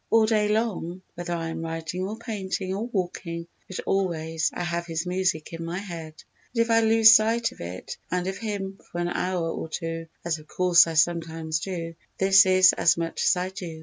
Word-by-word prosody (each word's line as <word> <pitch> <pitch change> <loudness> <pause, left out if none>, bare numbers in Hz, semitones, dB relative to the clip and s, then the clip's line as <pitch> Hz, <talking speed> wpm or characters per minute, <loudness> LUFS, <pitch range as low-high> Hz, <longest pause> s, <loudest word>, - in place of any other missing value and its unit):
All 225 -1 +5
day 215 -1 +2
long—whether 185 -5 -3
I 165 -1 -2
am 165 - -5
writing 165 +3 -4
or 215 +2 -5
painting 195 -4 -3
or 210 +4 -3
walking, 175 -5 -3 0.2
but 190 - -5
always—I 165 -4 -1
have 170 0 -2
his 165 +1 -2
music 180 -3 -1
in 165 0 -5
my 170 +2 -4
head; 170 -5 -7 0.4
and 230 - +3
if 230 - -3
I 225 - +6
lose 225 0 +7
sight 230 +2 +3
of - - -14
it 90 +2 -7
and 180 0 -1
of 190 0 -3
him 200 -3 -4
for - - -6
an 175 0 0
hour 180 -1 -1
or 160 - -5
two, 165 0 -4 0.2
as 165 -2 -1
of 155 - -16
course 180 -1 +5
I 165 - -4
sometimes 160 -1 +1
do, 165 -2 -5 0.2
this 190 0 +6
is 185 -1 +6
as 165 - +3
much 165 -1 -2
as - - +5
I 180 +1 -2
do. 175 -4 -7
180 Hz, 200 wpm, -26 LUFS, 165-195 Hz, 0.4 s, lose